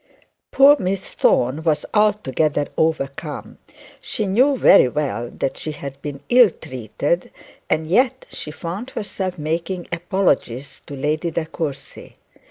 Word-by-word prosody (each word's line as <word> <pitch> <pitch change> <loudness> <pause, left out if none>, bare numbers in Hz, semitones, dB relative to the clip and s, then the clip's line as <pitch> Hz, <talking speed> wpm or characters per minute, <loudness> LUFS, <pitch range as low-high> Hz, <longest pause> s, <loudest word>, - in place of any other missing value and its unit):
Poor 280 +2 +7
Miss 190 +1 -2
Thorne 130 +5 +2
was 155 -2 0
altogether 160 -9 +1
overcome. 150 -1 -2 0.4
She 215 - -2
knew 255 +8 +3
very 130 - +7
well 125 -4 -2
that 135 - -3
she 155 - -4
had 140 -1 -8
been 145 -2 -6
ill 245 -3 +7
treated, 130 - -3 0.4
and 155 0 +1
yet 255 +10 +2
she - - -6
found 175 +10 -6
herself 190 -6 -4
making 165 +4 -3
apologies 145 -7 -1
to 145 - -7
Lady 150 +5 -1
De 160 0 -2
Courcy. 155 -3 -6
160 Hz, 130 wpm, -21 LUFS, 145-195 Hz, 0.4 s, Poor